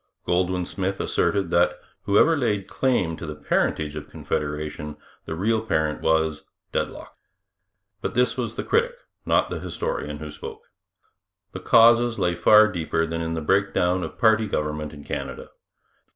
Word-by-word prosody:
Goldwin 90 0 0
Smith 95 +1 -3
asserted 95 -4 0
that, 85 +1 +3 0.3
whoever 105 +11 +4
laid 105 -9 -1
claim 110 -11 0
to 85 - -7
the 75 - -5
parentage 75 0 -1
of 75 -1 -7
Confederation, 75 0 -4 0.3
the 80 - -4
real 110 +6 +1
parent 80 -8 -1
was 80 -1 +1 0.3
Deadlock. - - -4 0.9
But - - -3
this 125 +1 +2
was 120 -3 -3
the - - -3
critic, 475 +2 +1 0.3
not - - +2
the - - -3
historian, - - -4
who - - -7
spoke. 450 0 -9 0.9
The - - -6
causes 115 0 +5
lay 90 0 +1
far 105 +5 +6
deeper 80 -4 -1
than 80 0 -3
in 80 0 -2
the 80 - -3
breakdown 95 +1 +1
of - - -6
party 110 -2 +4
government 75 -4 -2
in 70 -1 -11
Canada. 65 -2 -6
90 Hz, 150 wpm, -24 LUFS, 80-110 Hz, 0.9 s, far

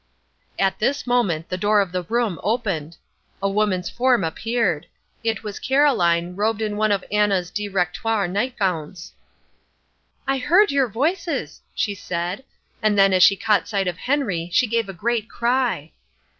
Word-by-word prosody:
At 195 -1 +1
this 275 +6 0
moment 200 -11 0
the 185 - -3
door 210 +1 +3
of 195 -3 0
the 180 0 -1
room 225 0 -1
opened. 190 -9 -2 0.4
A 195 - 0
woman's 195 -3 0
form 250 0 +2
appeared. 185 -1 -1 0.4
It 225 0 -1
was 210 -2 -6
Caroline, 180 -12 +2
robed 215 +2 0
in 215 -2 -2
one 215 0 +1
of 200 -2 +1
Anna's 200 -4 +1
directoire 200 +1 -1
nightgowns. 185 - -2 1.1
"I 270 0 +1
heard 355 +11 +4
your 275 -2 +2
voices," 290 - -2
she 205 - 0
said, 180 +3 -4 0.4
and 215 -2 +2
then, 195 -1 +5
as 185 - +3
she 195 - +7
caught 210 0 +1
sight 200 -3 -1
of 180 -1 -3
Henry, 220 - -1
she 250 - +3
gave 230 -2 -1
a - - -5
great 220 +4 -1
cry. 235 - 0
205 Hz, 155 wpm, -22 LUFS, 180-240 Hz, 1.1 s, she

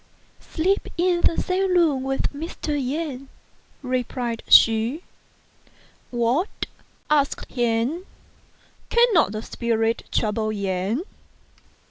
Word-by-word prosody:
Sleep 375 +5 -1
in 350 0 +2
the 330 - +2
same 370 0 0
room 305 -6 +3
with 270 +2 -2
Mr. 315 +2 -6
Yen," 275 -1 -3 0.5
replied 250 -2 -2
she. 230 +9 +5 0.5
" - - -32 0.2
What! 295 - 0 0.2
" - - -37
asked 285 -2 +1
he, 240 +6 0 0.4
" - - -34
cannot 470 - +4
the 215 +1 -5
spirits 230 -1 -1
trouble 215 0 0
Yen 200 - -2
265 Hz, 105 wpm, -23 LUFS, 230-330 Hz, 0.5 s, she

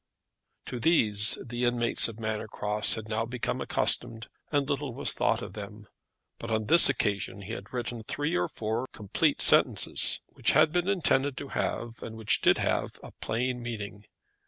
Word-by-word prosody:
To 125 - -6
these 105 -8 +4
the 120 +1 -5
inmates 120 -1 +4
of 115 -1 -10
Manor 110 -1 -4
Cross 105 0 +1
had 110 -1 -8
now 110 +1 -2
become 120 +1 -4
accustomed, 115 0 0 0.2
and 145 -2 0
little 140 -3 -4
was 140 - -1
thought 115 +1 -1
of 95 - -9
them; 105 0 -10 0.5
but 115 - -8
on 110 -1 -2
this 170 +10 +9
occasion 100 0 -2
he 100 - -9
had 100 -1 -9
written 120 -2 -5
three 145 +8 -4
or - - 0
four 115 +3 -4
complete 105 -3 -1
sentences, - - +3
which - - -1
had 155 - +3
been 175 +2 -1
intended 145 -8 +1
to 140 - -8
have, 115 0 -4
and 110 0 -9
which 110 -2 0
did - - +3
have, - - -2
a - - -11
plain 125 +2 -4
meaning. 105 -3 -8
115 Hz, 175 wpm, -27 LUFS, 110-130 Hz, 0.5 s, this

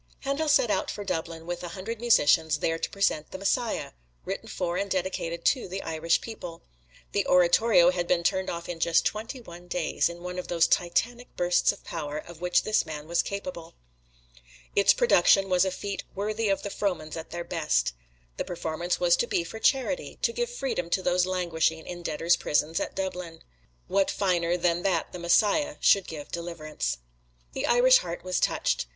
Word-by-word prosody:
Handel 280 +3 -1
set 245 -6 +4
out 190 - 0
for 205 - -5
Dublin 165 -3 -4
with 175 0 -4
a - - -4
hundred 220 +4 -5
musicians, 160 -8 +4
there 165 +2 -1
to - - -2
present 175 -6 0
the - - -7
"Messiah," 210 +4 -1 0.3
written - - -5
for 170 0 -2
and 200 +2 -1
dedicated 175 -3 -2
to 255 -7 +2
the 190 +2 -5
Irish 165 +1 0
people. 175 -7 -8 0.5
The - - 0
oratorio 180 +1 +5
had 175 -1 -2
been 175 -1 +2
turned 190 +2 +1
off 170 0 -5
in 175 -2 -5
just 165 0 +3
twenty 225 +5 -3
one 175 -4 -12
days, 175 -1 0
in 170 0 -9
one 180 0 -4
of - - -6
those 170 -1 +3
titanic 235 +10 0
bursts 175 0 +3
of 200 - -13
power, 150 -3 -5
of 170 +1 -9
which 180 0 +2
this 215 - +2
man 150 -1 -7
was 170 +1 +2
capable. 200 -5 -6 1.0
Its 200 - +6
production 195 - +4
was 180 0 +4
a 190 - 0
feat 200 +2 -5
worthy 215 +2 -1
of 195 - 0
the 200 - -4
Frohmans 175 -7 -2
at 160 -1 -7
their 170 0 -5
best. - - 0 0.4
The - - -1
performance 170 0 -3
was - - +4
to 480 -1 0
be 370 -6 0
for 225 - -8
charity 275 - 0
to 465 - +2
give 480 0 -1
freedom 270 - -3
to 185 - -8
those 180 0 +2
languishing 165 -3 0
in 175 -1 -7
debtors' 165 +1 +1
prisons 150 +2 0
at - - -4
Dublin. 180 -3 -5 0.4
What 195 0 +2
finer 175 -3 +1
than 175 0 +1
that 180 -4 0
the 180 - -7
"Messiah" 220 - +2
should 195 -2 +4
give 150 -3 -8
deliverance? 155 - -4 0.6
The - - -2
Irish 255 +2 +6
heart 170 -1 -6
was 185 0 -1
touched. - - 0
180 Hz, 190 wpm, -27 LUFS, 170-205 Hz, 1.0 s, Its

